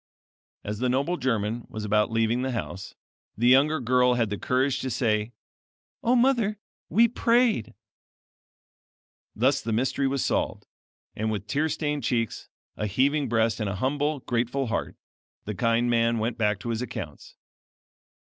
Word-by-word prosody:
As 105 0 -4
the 125 0 +1
noble 140 +8 +1
German 115 -5 -1
was 110 -1 -5
about 105 0 +2
leaving 115 +2 +1
the 130 0 -2
house, 95 -5 -5 0.4
the 120 +3 +2
younger 145 +4 +5
girl 125 0 +3
had 115 -4 0
the 105 - -2
courage 130 +6 +1
to 130 - -3
say: 110 -2 0 0.7
"O 240 +2 +3
mother, 240 -4 +2 0.3
we 230 +2 +5
prayed." 230 - +1 1.6
Thus 135 +5 +2
the 115 - -3
mystery 130 +4 +1
was 135 -1 -1
solved, - - -1 0.5
and 110 +1 -1
with 105 -2 -3
tear 150 +9 0
stained 150 -3 -2
cheeks, 115 -2 -2 0.3
a 105 - -2
heaving 135 +6 +1
breast, 115 -1 +1
and 105 -3 -1
a 100 - -3
humble, 145 +6 -1
grateful 125 +3 -1
heart, 115 - -3 0.5
the 105 - -3
kind 115 +4 +1
man 115 -1 +2
went 115 +1 -1
back 105 -3 +1
to 120 - -5
his 115 0 -1
accounts. 125 - -7
120 Hz, 155 wpm, -26 LUFS, 110-140 Hz, 1.6 s, younger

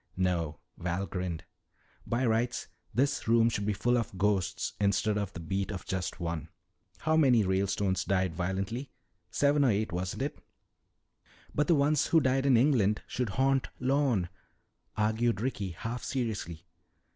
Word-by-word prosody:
"No," 85 -5 0 0.2
Val 90 +3 -1
grinned. 90 -3 -4 0.6
"By 120 +3 0
rights 120 +2 0 0.2
this 140 +3 0
room 115 0 +5
should 105 -2 -2
be 105 - +2
full 120 +4 +2
of 105 -4 -5
ghosts 95 -1 0
instead 100 +1 +2
of 100 -2 -2
the - - -7
beat 95 +4 -2
of 95 -3 -6
just 90 -1 -3
one. 85 -2 -3 0.5
How 155 +1 +2
many 130 -8 +5
Ralestones 95 0 0
died 95 -2 0
violently? 95 - -3 0.4
Seven 145 0 +3
or 135 - +4
eight, 105 0 0
wasn't 90 +8 -3
it?" 145 - -4 1.1
"But 150 - +1
the 170 - +5
ones 145 0 +3
who 165 - +5
died 135 -1 +1
in 130 -4 +6
England 115 -6 +3
should 125 -3 -2
haunt 135 0 +2
Lorne," 130 -8 +1 0.7
argued 110 0 +1
Ricky, 105 -5 -2
half 115 +8 -5
seriously. 100 - -3
105 Hz, 150 wpm, -30 LUFS, 95-130 Hz, 1.1 s, in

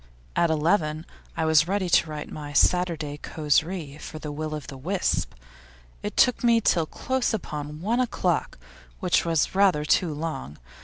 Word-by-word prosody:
At 170 - +3
eleven 160 0 +1 0.3
I 160 - +1
was 160 0 +4
ready 195 0 0
to 165 -1 +3
write 150 -1 -6
my 145 -1 -7
Saturday 160 -3 +2
causerie 155 0 -1
for 155 - -8
the 155 -1 -6
Will 155 +1 -4
o' - - -3
the 140 - -10
Wisp; 175 - -1 0.7
it - - -5
took 250 -1 +4
me 235 -1 +5
till 170 -7 +2
close 260 +2 -1
upon 150 -5 -6
one 225 +6 0
o'clock, 250 -2 0 0.4
which 180 -3 +2
was 165 -2 +1
rather 190 -6 +3
too 165 +2 +2
long. 145 - -5
160 Hz, 160 wpm, -25 LUFS, 150-185 Hz, 0.7 s, me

